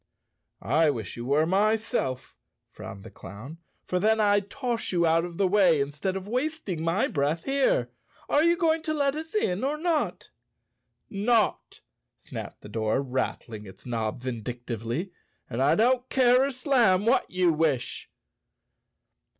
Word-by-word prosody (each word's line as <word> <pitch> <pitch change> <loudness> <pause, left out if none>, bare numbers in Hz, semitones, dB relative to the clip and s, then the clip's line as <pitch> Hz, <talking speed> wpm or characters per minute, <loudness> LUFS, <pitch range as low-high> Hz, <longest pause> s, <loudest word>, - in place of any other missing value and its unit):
"I 155 +5 +3
wish 115 -9 -4
you 120 - -6
were, 145 +3 +3
myself," 205 - 0 0.4
frowned 100 - -9
the 110 - -11
clown, 120 +12 -10 0.3
"for 180 - -1
then 220 +3 +3
I'd 205 -1 +2
toss 240 -1 -3
you 170 -2 +2
out 165 +1 +3
of 170 -1 -7
the 195 - +3
way 180 -5 +4
instead 150 +7 -2
of 190 0 -5
wasting 250 - -2
my 165 +5 +1
breath 150 +3 -1
here. 270 - +1 0.4
Are 290 - +3
you 340 +1 +3
going 325 -2 +2
to 310 0 -2
let 280 -2 +1
us 320 +5 -7
in 200 - 0
or 285 +3 0
not?" 320 -1 -1 0.8
"Not!" 215 +2 0 0.4
snapped - - -8
the - - -11
door, 110 +2 0
rattling 125 -5 -4
its 95 - -14
knob 115 -1 -2
vindic¬ 120 -1 -5
tively. 120 - -4 0.4
"And 125 +1 -3
I 140 +2 +4
don't 250 +3 +2
care 255 0 +4
a 280 - -2
slam 245 -7 +2
what 230 - +2
you 180 -2 +2
wish." 150 -6 -1
180 Hz, 155 wpm, -27 LUFS, -, 0.8 s, way